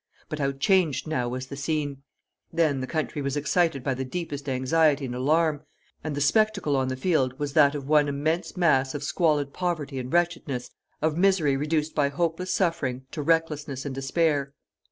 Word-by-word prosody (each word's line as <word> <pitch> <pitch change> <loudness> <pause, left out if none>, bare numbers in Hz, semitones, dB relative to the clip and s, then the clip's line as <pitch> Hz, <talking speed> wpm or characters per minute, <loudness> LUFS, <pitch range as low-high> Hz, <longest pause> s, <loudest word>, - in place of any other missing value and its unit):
But 155 - -4
how 140 -1 +1
changed 155 -1 +2
now 125 -6 -1
was 130 +1 -4
the 140 - -8
scene! 145 -1 -2 0.5
Then 160 -5 +1
the 130 - -3
country 155 -1 -2
was 140 +1 -2
excited 150 -2 +1
by 135 - 0
the 130 +1 -3
deepest 145 -1 -5
anxiety 140 +2 +2
and 125 - -4
alarm, 150 +4 +1 0.4
and 155 -2 -3
the 145 - -2
spectacle 200 -1 +2
on 130 -1 +1
the 130 - -2
field 130 -5 +1
was 145 -1 -3
that 145 -1 +5
of 140 -2 -5
one 150 -1 +4
immense 160 +5 -2
mass 135 -6 +2
of 145 - -4
squalid 150 -3 +1
poverty 160 -7 -2
and 125 0 -6
wretchedness, 165 -8 -1 0.3
of 155 0 +1
misery 180 -7 +3
reduced 150 +2 -1
by 145 -2 +2
hopeless 170 +4 -1
suffering 130 -8 -1
to 155 - -4
recklessness 150 -3 0
and 140 - -3
despair. 140 +1 0
145 Hz, 180 wpm, -26 LUFS, 135-165 Hz, 0.5 s, that